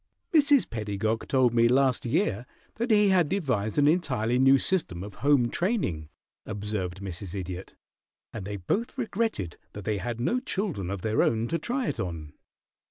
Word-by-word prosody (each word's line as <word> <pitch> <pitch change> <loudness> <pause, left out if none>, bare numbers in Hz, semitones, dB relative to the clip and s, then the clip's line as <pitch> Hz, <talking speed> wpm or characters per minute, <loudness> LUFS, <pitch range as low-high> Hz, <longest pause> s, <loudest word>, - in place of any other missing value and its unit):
"Mrs. 290 -3 +5
Pedagog 110 0 -2
told 130 -3 +3
me 115 0 +5
last 130 0 +2
year 115 0 0 0.3
that 235 +2 -1
he 210 -2 +5
had 180 -5 +3
devised 125 - -1
an 145 0 +5
entirely 125 -8 +1
new 135 +1 +6
system 135 - -1
of 100 0 -8
home 140 -4 +3
training," 170 - -1 0.3
observed 100 -3 -4
Mrs. 95 0 -6
Idiot, 95 -1 -6 0.6
"and 110 - -5
they 100 +1 -5
both 220 - -2
regretted 220 - -2 0.2
that 105 -2 -8
they 105 -2 0
had 120 +1 -4
no 235 - +1
children 185 - -2
of 100 -2 -4
their 110 +2 +1
own 115 0 +1
to 165 - 0
try 250 +1 -1
it - - -3
on." 80 -5 -5
115 Hz, 165 wpm, -27 LUFS, -, 0.6 s, new